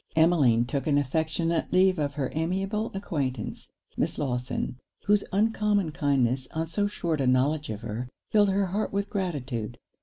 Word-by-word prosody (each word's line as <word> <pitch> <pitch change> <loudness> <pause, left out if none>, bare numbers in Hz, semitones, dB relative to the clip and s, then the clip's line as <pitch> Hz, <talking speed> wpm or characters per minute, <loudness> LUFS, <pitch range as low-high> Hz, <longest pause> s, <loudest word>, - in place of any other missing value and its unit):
Emmeline 150 -8 +4
took 135 +4 -2
an 145 -2 +3
affectionate 160 +4 0
leave 185 -1 +4
of 145 -1 -1
her 135 -4 -2
amiable 195 +7 -1
acquaintance, 145 -9 -3 0.2
Miss - - -1
Lawson, 125 -2 -2 0.3
whose 205 0 +4
uncommon 210 -3 +2
kindness, 130 -4 +1
on 160 +1 0
so 205 +5 0
short 170 -7 -2
a 130 - +1
knowledge 145 +4 +2
of 105 -1 -4
her, 120 +2 -4 0.2
filled 205 -2 +5
her 195 +1 +2
heart 200 +4 -2
with 200 0 -2
gratitude. 135 - -3
155 Hz, 155 wpm, -27 LUFS, 130-195 Hz, 0.3 s, filled